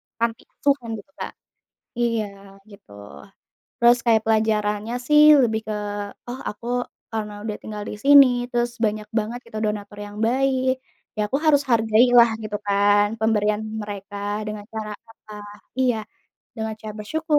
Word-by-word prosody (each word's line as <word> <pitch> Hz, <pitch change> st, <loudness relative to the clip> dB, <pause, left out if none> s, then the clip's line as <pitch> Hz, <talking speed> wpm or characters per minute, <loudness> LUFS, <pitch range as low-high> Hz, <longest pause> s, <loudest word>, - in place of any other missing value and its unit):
panti 230 Hz, 0 st, -2 dB
asuhan, 280 Hz, -5 st, 0 dB
gitu, 210 Hz, +6 st, -11 dB
Kak. -, -, -4 dB, 0.7 s
Iya, 230 Hz, -3 st, +1 dB, 0.4 s
gitu. 200 Hz, -, -16 dB, 0.9 s
Terus, 240 Hz, +1 st, +6 dB
kayak 225 Hz, -2 st, +4 dB
pelajarannya 215 Hz, 0 st, +1 dB
sih, 300 Hz, 0 st, +6 dB, 0.2 s
lebih 220 Hz, -3 st, +2 dB
ke, 215 Hz, -, -2 dB, 0.5 s
"Oh, 245 Hz, +2 st, -6 dB
aku, 230 Hz, +3 st, -9 dB, 0.4 s
karena 215 Hz, -2 st, -3 dB
udah 215 Hz, -1 st, -3 dB
tinggal 210 Hz, -1 st, -6 dB
di -, -, -5 dB
sini, 280 Hz, -1 st, +9 dB, 0.2 s
terus 240 Hz, 0 st, 0 dB
banyak 215 Hz, -1 st, -1 dB
banget, 225 Hz, +3 st, -4 dB
gitu, 220 Hz, -, -8 dB
donatur 205 Hz, -1 st, -4 dB
yang 205 Hz, 0 st, -10 dB
baik, 260 Hz, +1 st, +1 dB, 0.4 s
ya 210 Hz, -, +1 dB
aku 275 Hz, -, +2 dB
harus 290 Hz, -2 st, +4 dB
hargailah," 235 Hz, +1 st, +5 dB
gitu 210 Hz, -1 st, -3 dB
kan, 205 Hz, +1 st, +4 dB
"pemberian 210 Hz, -1 st, +1 dB, 0.2 s
mereka." 205 Hz, 0 st, -7 dB, 0.3 s
Dengan 210 Hz, -1 st, -5 dB
cara 215 Hz, -1 st, -4 dB, 0.2 s
apa? 215 Hz, -1 st, -15 dB, 0.5 s
Iya, 250 Hz, -3 st, +3 dB, 0.6 s
dengan 220 Hz, 0 st, -3 dB
cara 215 Hz, -1 st, -7 dB
bersyukur 310 Hz, +7 st, 0 dB
220 Hz, 140 wpm, -23 LUFS, 210-240 Hz, 0.9 s, sini